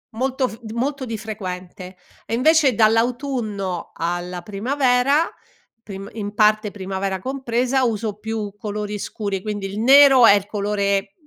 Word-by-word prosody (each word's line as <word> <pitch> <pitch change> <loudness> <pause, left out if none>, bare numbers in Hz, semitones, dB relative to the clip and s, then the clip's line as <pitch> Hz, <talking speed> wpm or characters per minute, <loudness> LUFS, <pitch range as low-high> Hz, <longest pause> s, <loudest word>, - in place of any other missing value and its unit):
molto 260 +1 0
f 220 -2 -10
molto 265 +3 -2
di 225 -2 -4
frequente, 185 -3 -7 0.3
e - - -5
invece 285 +2 +4
dall'autunno 225 -4 0
alla 175 +1 -3
primavera, 250 - +1 0.5
prim 195 -2 -8
in 205 -2 -5
parte 215 -1 +3
primavera 190 -1 -3
compresa, 255 +2 -1
uso 215 -2 -2
più 220 -2 -4
colori 210 0 -4
scuri, 200 -1 -4
quindi 205 -2 -4
il 200 +2 -6
nero 270 +1 +7
è 215 - +8
il 200 -1 -2
colore 200 -1 -1
215 Hz, 135 wpm, -21 LUFS, 200-250 Hz, 0.5 s, è